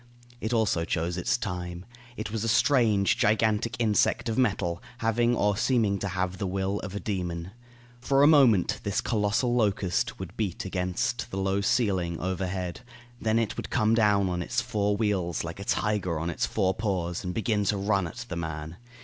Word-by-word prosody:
It 110 - -3
also 110 -8 +1
chose 85 +1 -1
its 90 +6 0
time. 90 -5 -5 0.3
It 110 -1 -4
was 110 -1 -2
a - - -1
strange, 115 -4 +3
gigantic 110 +1 +2
insect 115 +1 +2
of 110 - -1
metal, 100 -9 0 0.2
having 120 0 +2
or 105 -2 +2
seeming 115 -4 +1
to 100 - -2
have 95 0 -2
the 100 - -1
will 95 +2 -1
of 100 0 -7
a - - -2
demon. 90 -4 -3 0.5
For 135 +3 +3
a - - +8
moment 130 - +5
this 100 - -1
colossal 110 +2 +1
locust 100 -6 0
would 95 -3 -8
beat 100 -5 -3
against 90 -1 -2
the 95 - -5
low 95 +1 0
ceiling 100 -7 +1
overhead, 95 0 -3 0.4
then 110 0 +1
it 115 -2 0
would - - -5
come 110 +1 +2
down 105 -3 +3
on 90 -1 -2
its - - -1
four 105 -4 0
wheels 95 -6 0
like 85 +3 -6
a - - -5
tiger 100 -6 0
on 85 +2 -2
its - - -1
four 95 -3 +1
paws, 95 -5 -2
and 90 - -3
begin 110 -2 +1
to 100 - +1
run 100 -2 +1
at 80 - -8
the - - -5
man. 80 0 -5
100 Hz, 185 wpm, -27 LUFS, 90-110 Hz, 0.5 s, a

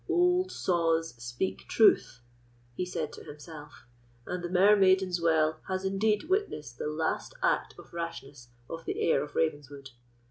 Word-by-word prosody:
"Old 360 +1 +3
saws 165 -3 0
speak 120 -6 -3
truth," 125 - +3 0.5
he 180 +9 -3
said 155 -4 -4
to - - -10
himself, 150 0 -11 0.4
"and 180 -1 -4
the 175 - -3
Mermaiden's 190 -1 +4
Well 160 -1 +2
has 190 0 -2
indeed 205 +2 +1
witnessed 155 - -2
the - - -2
last 155 +1 -2
act - - +1
of - - -15
rashness 145 -7 -6 0.2
of 165 0 -7
the - - -3
heir 150 - +2
of 145 0 -10
Ravenswood. 145 -4 -2
165 Hz, 145 wpm, -29 LUFS, 145-190 Hz, 0.5 s, Mermaiden's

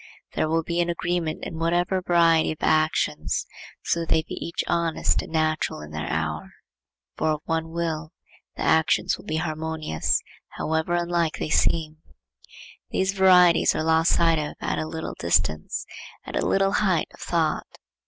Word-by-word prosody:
There 155 - 0
will 165 +1 +1
be 170 +2 -2
an 175 - -1
agreement 170 -1 -2
in 160 -3 -6
whatever 175 +3 +1
variety 170 -3 +3
of - - -15
actions, 155 0 +1 0.4
so 170 - 0
they 160 -1 +1
be - - -9
each 170 - -3
honest 170 -2 +1
and - - -10
natural 155 - 0
in 75 0 -10
their 75 0 -4
hour. 80 -1 -3 0.6
For - - 0
of 155 - -5
one 165 0 -1
will, 165 -1 -3 0.4
the - - -4
actions 160 0 +3
will - - -13
be 155 - -3
harmonious, 160 - -1 0.4
however 160 +2 0
unlike 170 -2 0
they 155 - -4
seem. 160 -2 +1 0.9
These 190 +1 0
varieties 180 -3 +5
are - - -1
lost 160 +1 +3
sight 165 -2 +3
of 150 -1 -4
at 85 -2 -2
a 80 - -3
little - - -5
distance, 75 0 0 0.4
at - - -7
a - - 0
little 195 0 +2
height 190 -6 +1
of - - -17
thought. 165 -3 -1
160 Hz, 165 wpm, -24 LUFS, 155-170 Hz, 0.9 s, varieties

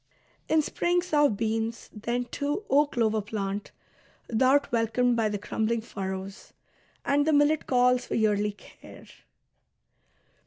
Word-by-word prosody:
In 315 -1 +3
spring 350 +3 0
sow 295 -5 +3
beans; 225 +2 -2
then, 235 +3 -2
too, 290 - -3
O 290 +2 +5
clover 220 -5 0
plant, 205 -1 -4 0.6
Thou'rt 260 +5 +3
welcomed 240 +1 +1
by 225 -2 +1
the 205 - -2
crumbling 220 +3 -2
furrows; 195 -1 -7 0.5
and 290 +1 +2
The 315 - +3
millet 290 +1 +3
calls 250 0 +2
for - - -3
yearly 210 -1 +1
care." - - -15
235 Hz, 125 wpm, -27 LUFS, 215-285 Hz, 0.6 s, O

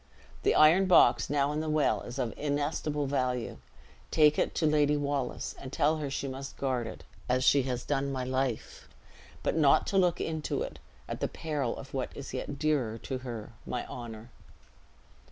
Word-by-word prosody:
The - - +2
iron 165 +5 +6
box 185 - +5
now 145 0 +2
in 150 - -1
the 155 0 -2
well 155 -1 +2
is 120 +2 -7
of 125 -4 -1
inestimable 145 0 -1
value; 125 -3 -1 0.5
take 150 -1 +4
it - - 0
to 160 - +1
Lady 150 -1 +3
Wallace 140 -3 -2
and 130 - -8
tell 150 +2 +2
her 150 -2 -3
she 135 +1 -3
must 135 +1 -7
guard 130 -4 -1
it, - - -9 0.3
as 130 +1 +2
she 140 +1 +5
has 125 -1 -3
done 140 -1 0
my 130 -1 -2
life; 130 - -3 0.5
but - - 0
not 145 -4 +5
to 195 - +2
look 180 -2 +2
into 160 -2 -2
it, - - -7 0.3
at - - -5
the - - 0
peril 145 -6 -3
of 135 - -10
what 130 -2 -2
is 140 - -7
yet 140 +2 -4
dearer 140 -8 0
to 130 +3 -5
her 120 -3 -7
my 125 - -3
honor." 115 -1 -8
140 Hz, 185 wpm, -30 LUFS, 125-150 Hz, 0.5 s, iron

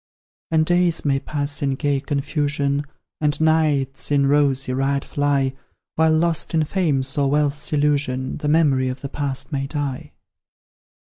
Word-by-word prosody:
And 160 -1 +2
days 175 -1 +2
may 135 -1 +2
pass 145 0 -2
in 135 -2 0
gay 145 0 0
confusion, 145 0 -1 0.3
And 150 -1 0
nights 155 -4 +1
in 140 -1 +3
rosy 135 -2 +2
riot 135 +1 0
fly, 140 -2 0 0.4
While, 160 0 +3
lost 165 0 0
in 160 -1 +2
Fame's 145 -7 0
or 140 -1 +2
Wealth's 150 0 0
illusion, 145 -3 0
The 150 - -4
memory 145 -4 +3
of 130 - -6
the 140 - -5
Past 140 +1 -3
may 135 -1 -2
die. 145 -3 -4
145 Hz, 145 wpm, -21 LUFS, 135-150 Hz, 0.4 s, in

